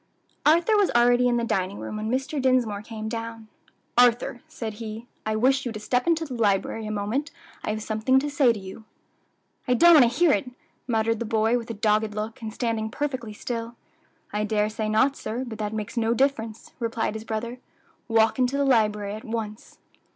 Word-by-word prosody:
Arthur 340 +8 +5
was 405 -2 +3
already 245 +1 +5
in 240 -1 +2
the 235 - 0
dining 200 -3 -1
room - - -6
when 215 +1 -3
Mr. 270 +3 -1
Dinsmore 250 -6 +2
came 220 0 -7
down. 225 -1 -6 0.5
"Arthur," 245 0 +3
said 220 -2 -5
he, 220 +1 -6 0.2
"I 215 - 0
wish 265 +4 +3
you 240 - -3
to 215 - -6
step 245 +5 0
into 330 -1 +2
the 275 - -7
library 220 -1 0
a - - -3
moment; 215 +8 -2 0.3
I - - -3
have 215 0 -2
something 220 +5 +2
to 275 +2 +1
say 280 -4 +4
to 220 - -4
you." 190 +3 -10 0.8
"I 250 - +3
don't 345 +8 +7
want 250 -7 +7
to - - -7
hear 345 -3 +5
it," 265 - 0 0.4
muttered 225 -1 +1
the 235 - -2
boy, 225 +1 +2
with 235 -1 -3
a 230 - -4
dogged 210 0 +1
look, 215 +2 -5
and 220 -1 -5
standing 225 -1 -2
perfectly 260 -3 -3
still. 230 +2 -5 0.6
"I 210 0 0
dare 210 0 +1
say 215 0 -3
not, 265 +6 +3
sir; 240 +1 -4
but 225 -3 -8
that 210 -1 -2
makes 215 +1 -5
no 230 0 +1
difference," 230 -4 -1
replied 230 -2 -1
his 220 0 -6
brother. 230 +3 -4 0.5
"Walk 225 +1 +3
into 255 +2 +2
the 280 - +2
library 210 -5 +2
at 215 - -7
once." 220 -1 -6
230 Hz, 200 wpm, -25 LUFS, 215-250 Hz, 0.8 s, don't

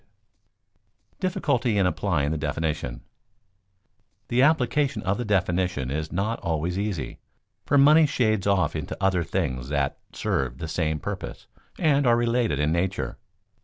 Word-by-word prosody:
[Sidenote: - - -44
Difficulty 135 - 0
in 100 - +3
applying 85 -6 0
the 80 - -1
definition] 75 -6 -2 1.3
The 120 +1 +3
application 145 -1 +2
of 100 +2 0
the 120 - -2
definition 90 -8 0
is 75 +2 -3
not 105 +5 -1
always 85 +3 -2
easy, 95 - -3 0.5
for 145 - +3
money 150 +3 +7
shades 110 -7 +1
off 100 -2 +2
into - - -4
other 95 -3 +2
things 65 -4 -2
that 70 -2 -1
serve - - -2
the 80 - -5
same 80 -1 -1
purpose - - -6 0.3
and 145 -5 +3
are 120 -1 +5
related 120 - +1
in 75 +2 +1
nature. 95 +3 -1
95 Hz, 140 wpm, -25 LUFS, 80-120 Hz, 1.3 s, money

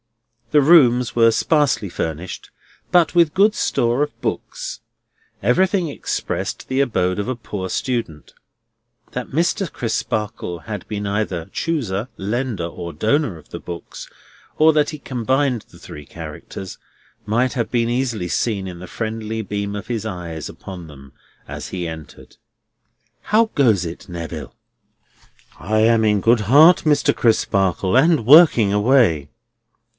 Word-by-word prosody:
The 150 +2 +4
rooms 125 -6 +5
were 115 -1 +5
sparely 145 -2 +1
furnished, 85 +2 -5 0.4
but 175 -2 +4
with 170 -3 +4
good 210 +2 +4
store 120 +3 0
of 145 0 -3
books. - - -5 0.6
Everything 180 - +2
expressed 145 - -4
the 130 +1 +1
abode 90 -8 0
of 105 - -3
a 130 - -1
poor 100 -5 -6
student. 115 - -3 0.8
That 125 -1 -5
Mr. 170 +3 0
Crisparkle 105 -6 -3
had 105 -2 -6
been 105 -1 -3
either 100 -5 -2
chooser, 125 -9 -2
lender, 110 -2 -2
or 85 0 -6
donor 110 - 0
of 80 - -17
the - - -8
books, 85 -1 -8 0.5
or 160 +1 +5
that 150 -1 +2
he 155 - -6
combined 130 -1 -1
the - - -17
three 75 -1 -10
characters, 80 +5 -9 0.5
might 120 +4 +1
have 120 -3 -2
been 115 -2 +1
easily 120 -6 -1
seen 100 +2 -1
in 90 -2 -8
the 90 - -9
friendly 110 +1 -4
beam 100 0 -4
of 100 - -6
his 115 -3 -3
eyes 85 - -6
upon 90 -3 -9
them 70 -3 -14 0.3
as - - -7
he 90 -2 -4
entered. 80 -2 -10 0.9
"How 220 +1 +2
goes 110 - +3
it, 85 +4 -8
Neville?" 85 -3 -7 1.1
"I 110 +1 0
am 115 0 +4
in 105 -1 +3
good 115 +1 +3
heart, 150 - +7
Mr. 150 -2 +3
Crisparkle, 95 -4 +1
and 150 -2 +4
working 130 - +7
away." 105 - +3
110 Hz, 140 wpm, -20 LUFS, 95-135 Hz, 1.1 s, heart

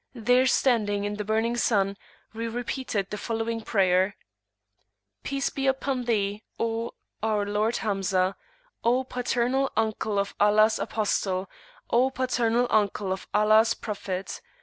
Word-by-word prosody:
There 245 +3 +3
standing 215 -6 +2
in 205 0 -3
the 210 - -2
burning 220 +3 0
sun, 200 -4 +1 0.4
we 230 +1 -3
repeated 235 -3 -3
the 210 - -4
following 225 0 -2
prayer: 190 -2 +2 1.1
"Peace 275 0 -2
be 270 0 -2
upon 265 -1 0
Thee, 205 -3 0 0.2
O 230 0 -2 0.3
our 215 -2 +1
Lord 210 +3 0
Hamzah! 195 -2 0 0.5
O 245 +3 +3
Paternal 250 +1 0
Uncle 220 -1 0
of 200 0 -1
Allah's 215 +1 +4
Apostle! 195 -3 -1 0.4
O 250 +3 +4
Paternal 245 -2 +1
Uncle 205 -2 +1
of 190 - -8
Allah's 215 +2 +4
Prophet! 195 -3 -5
220 Hz, 125 wpm, -26 LUFS, 205-240 Hz, 1.1 s, Allah's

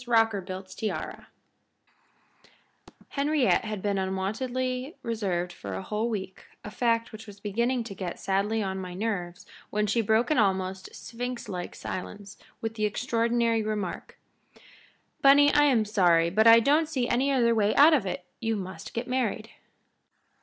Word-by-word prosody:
ROCKERBILT'S 195 -5 0
TIARA 215 +2 -5 1.8
Henriette 285 -4 +1
had 215 -3 -5
been 200 -1 0
unwontedly 250 - -2
reserved 190 -6 -2
for 100 -2 -7
a 95 - -5
whole 215 +3 -2
week, 190 -4 -5 0.2
a 210 - -7
fact 230 0 0
which 220 0 -10
was 205 -1 -12
beginning 235 +5 -1
to 225 -3 -8
get 185 -3 -5
sadly 205 +3 0
on 190 -1 -3
my 180 -1 -7
nerves 195 -2 -3 0.2
when 210 0 0
she 215 +3 +1
broke 220 +5 +2
an 305 - +3
almost 190 -2 0
Sphinxlike 235 -7 -6
silence 200 +2 -7 0.2
with 225 0 -3
the 215 -1 -1
extraordinary 230 +1 +1
remark: 210 -4 -4 1.0
"Bunny, 285 +1 +6
I 295 - +5
am 245 -7 +3
sorry, 175 -5 +3
but 220 +4 +4
I 230 0 +9
don't 300 +5 +2
see 255 -6 -1
any 260 +4 +1
other 235 -3 +3
way 215 -2 +2
out 305 +3 +7
of 275 -8 +3
it. 180 -1 -4
You 225 -1 -1
must 185 -4 -7
get 235 - -3
married." 255 0 -2
220 Hz, 150 wpm, -27 LUFS, 190-240 Hz, 1.8 s, I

